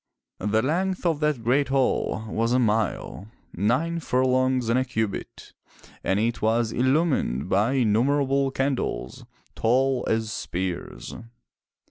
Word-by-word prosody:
The 105 +2 +1
length 185 +6 -1
of 165 -4 +1
that 150 -6 0
great 135 +5 +2
hall 130 -5 0
was 115 +2 0
a - - +4
mile, 110 -4 -1 0.3
nine 130 - 0
furlongs 130 -3 +1
and 115 +2 +3
a - - +1
cubit, 110 -5 -4 0.5
and 95 +1 +1
it 115 +2 -1
was 115 +1 +1
illumined 130 - +1
by 105 +8 +2
innum 115 -1 +2
erable 140 -1 +1
candles, 135 - -2 0.3
tall 130 +2 +1
as 110 -1 0
spears. 90 -3 -4
125 Hz, 125 wpm, -25 LUFS, 110-135 Hz, 0.5 s, a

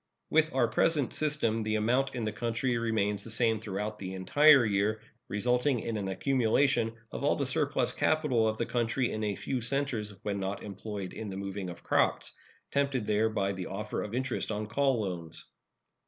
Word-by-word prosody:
With 160 0 +4
our 120 -3 +4
present 140 +4 +1
system 145 -7 +1
the 110 0 -1
amount 125 +6 +1
in 120 -3 -2
the 110 - -1
country 115 +3 -1
remains 105 -3 0
the 115 - -7
same 110 0 +2
throughout 105 +1 -4
the 95 -1 -5
entire 145 +8 +6
year, 105 +1 +1 0.3
resulting 125 +4 +1
in 115 - -3
an 100 -2 -2
accumulation 120 +2 +2 0.2
of - - -5
all - - +3
the - - -1
surplus - - +1
capital 150 -8 +2
of 110 0 -1
the 115 - -1
country 120 +1 0
in 110 - -3
a 105 -1 -1
few 130 +4 -3
centers 115 -5 -1
when 100 -1 -2
not 100 +1 -3
employed 100 -1 -6
in 110 -2 -6
the 95 - -5
moving 100 -1 -4
of 85 - -10
crops, - - +1 0.4
tempted 140 -5 0
there 105 +2 +2
by 100 -3 0
the 95 -2 -5
offer 105 +2 -4
of 105 +2 -5
interest 130 -3 -2
on 105 0 -2
call 130 +2 +1
loans. 85 -5 -4
110 Hz, 185 wpm, -30 LUFS, 105-125 Hz, 0.4 s, entire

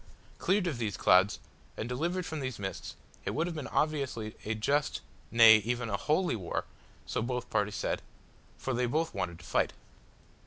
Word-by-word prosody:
Cleared 195 0 +2
of 150 -9 -2
these 105 -4 -2
clouds, 95 +3 +5 0.4
and 110 - -3
delivered 170 +8 -1
from 160 - -4
those 130 -4 -3
mists, 95 -1 -5 0.3
it - - -3
would 160 - +1
have 175 -1 -4
been 150 -4 -4
obviously 135 -8 -1
a 110 +1 -1
just 140 +7 0 0.3
nay, 115 -2 +9
even 115 +1 -2
a - - +1
holy 155 - +1
war 95 -6 -3 0.4
so - - -2
both 125 +1 -3
parties 105 0 +1
said, - - -1 0.6
for 130 - -2
they 125 0 +1
both 160 +6 0
wanted 90 -4 -3
to 85 - -14
fight. - - +1
125 Hz, 180 wpm, -31 LUFS, 105-150 Hz, 0.6 s, nay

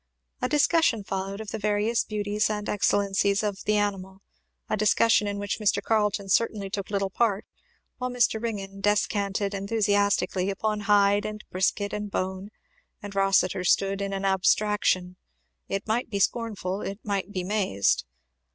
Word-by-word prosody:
A 250 - 0
discussion 295 -5 +3
followed 195 +1 -4
of 215 - -7
the 220 - -4
various 210 +2 +1
beauties 210 0 -1
and 210 -1 -3
excellencies 200 0 +1
of 205 -2 -3
the 210 - +2
animal; 195 -1 -3 0.4
a - - 0
discussion 215 +1 +3
in 205 0 -3
which 205 +1 -3
Mr. 205 -1 +2
Carleton 210 -2 0
certainly 200 -1 +1
took 200 -2 -4
little 195 -1 -1
part, 210 -2 0 0.5
while 250 0 -2
Mr. 240 -3 +1
Ringgan 195 -4 -5
descanted 205 -1 0
enthusiastically 200 -2 +1
upon 210 +2 -1
'hide' 205 0 +4
and 215 0 -7
'brisket' 200 +2 0
and 210 0 -3
'bone,' 190 +1 -3 0.5
and 205 -1 -7
Rossitur 195 -2 +2
stood 195 +2 +2
in 200 0 -2
an 195 0 -3
abstraction, 190 -1 +1 0.5
it 195 0 -2
might 230 +3 -1
be 205 - -2
scornful, 200 -2 -1
it 195 - -4
might 200 -1 -2
be 185 -2 -3
mazed. 185 - +1
205 Hz, 150 wpm, -26 LUFS, 195-210 Hz, 0.5 s, hide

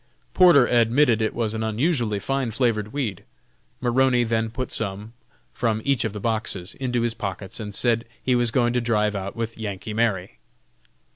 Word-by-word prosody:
Porter 175 -8 +7
admitted 120 0 +3
it 110 - -1
was 115 -2 -1
an 110 - -3
unusually 115 0 0
fine 135 +4 -1
flavored 110 -3 0
weed. 115 -10 -3 0.6
Maroney 125 0 +3
then 115 -1 0
put 130 +2 -5
some, 105 +1 -2 0.4
from 110 -3 0
each 140 -3 +2
of 110 - -1
the 105 - -6
boxes, 110 -4 -2
into 125 -3 -1
his 120 -1 0
pockets, 100 -1 -5
and 105 -2 -6
said 115 0 +1
he 130 - 0
was 120 -1 +3
going 120 +1 +1
to 125 - +1
drive 105 -3 +1
out 100 +1 -4
with 115 -1 -4
"Yankee 105 0 -5
Mary." 105 -5 -1
115 Hz, 170 wpm, -24 LUFS, 105-125 Hz, 0.6 s, Porter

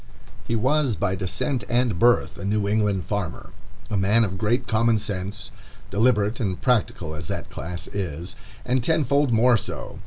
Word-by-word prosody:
He 115 - -1
was 130 +1 +2
by 95 -1 0
descent 105 +7 -1
and 120 -6 +1
birth 120 0 +3
a - - -6
New 100 +1 0
England 105 -3 +1
farmer, 100 -5 -4 0.4
a 105 - -3
man 100 +4 +4
of 95 -3 -2
great 120 +4 +1
common 115 0 +2
sense, 100 -1 -5 0.4
deliberate 105 0 +2
and 95 -6 -2
practical 105 -10 0
as 80 0 -6
that - - -5
class 90 0 -5
is, 90 -2 -4 0.3
and 125 0 +1
tenfold 140 -2 +2
more 120 +1 +5
so. - - -5
105 Hz, 160 wpm, -24 LUFS, 95-120 Hz, 0.4 s, more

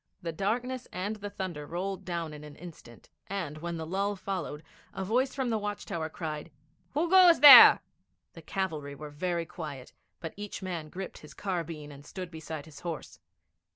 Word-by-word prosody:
The 165 - -2
darkness 240 +9 -2
and 205 +4 -3
the 205 0 -6
thunder 180 -7 -5
rolled 190 +3 -4
down 170 -3 -3
in 150 0 -10
an 150 -1 -11
instant, 155 -9 -13 0.2
and, 170 -6 -4
when 170 +1 -4
the 160 - -5
lull 200 +4 -1
followed, 185 -6 -4 0.3
a 190 - -3
voice 250 +6 +1
from 260 -3 -1
the 220 - +1
watch 205 0 -4
tower 160 -1 -3
cried, 155 -1 -5 0.5
'Who 320 +4 +2
goes 360 -1 +7
there?' 290 -1 +12 0.5
The - - -11
cavalry 155 -8 -3
were 150 +1 -9
very 170 +2 -2
quiet, 150 -6 -8 0.3
but 165 -2 -6
each 205 -1 -7
man 170 -5 -4
gripped 190 +3 -7
his 150 - -14
carbine 165 -6 -4
and 140 0 -12
stood 180 +3 -7
beside 160 -2 -7
his 150 -3 -13
horse. 170 -4 -6
175 Hz, 180 wpm, -29 LUFS, 155-200 Hz, 0.5 s, there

